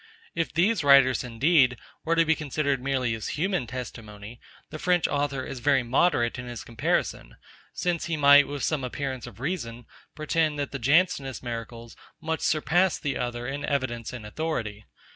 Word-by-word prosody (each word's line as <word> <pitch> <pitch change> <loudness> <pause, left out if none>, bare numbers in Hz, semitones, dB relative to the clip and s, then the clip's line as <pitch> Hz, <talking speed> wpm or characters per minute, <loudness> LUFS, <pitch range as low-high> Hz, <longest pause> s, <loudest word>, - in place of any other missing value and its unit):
If 165 -1 -2
these 185 +4 +2
writers, 135 -2 +5
indeed, 125 +1 +3 0.3
were 165 +1 +1
to 165 0 +4
be 160 - +4
considered 140 -3 -1
merely 130 -3 0
as 110 +4 -4
human 180 -6 -1
testimony, 115 -3 -8 0.3
the 155 - -7
French 180 0 +2
author 140 -2 -1
is 135 - -6
very 135 +1 +2
moderate 120 -1 +1
in 125 - -7
his 120 -1 -7
comparison; - - -2 0.4
since 175 -3 -1
he 165 -1 -2
might, 145 0 +7
with 145 0 -5
some 150 -4 0
appearance 130 0 -4
of 115 -3 -12
reason, 120 -6 -4 0.3
pretend, 155 0 0
that 145 -1 -3
the 140 - -5
Jansenist 140 -1 +1
miracles 115 -1 -7 0.2
much 160 0 -2
surpass 175 +4 +2
the 140 -3 -3
other 120 -1 -3
in 140 +3 -4
evidence 130 -5 -2
and 120 -4 -8
authority. 110 -5 -4
135 Hz, 165 wpm, -26 LUFS, 120-155 Hz, 0.4 s, might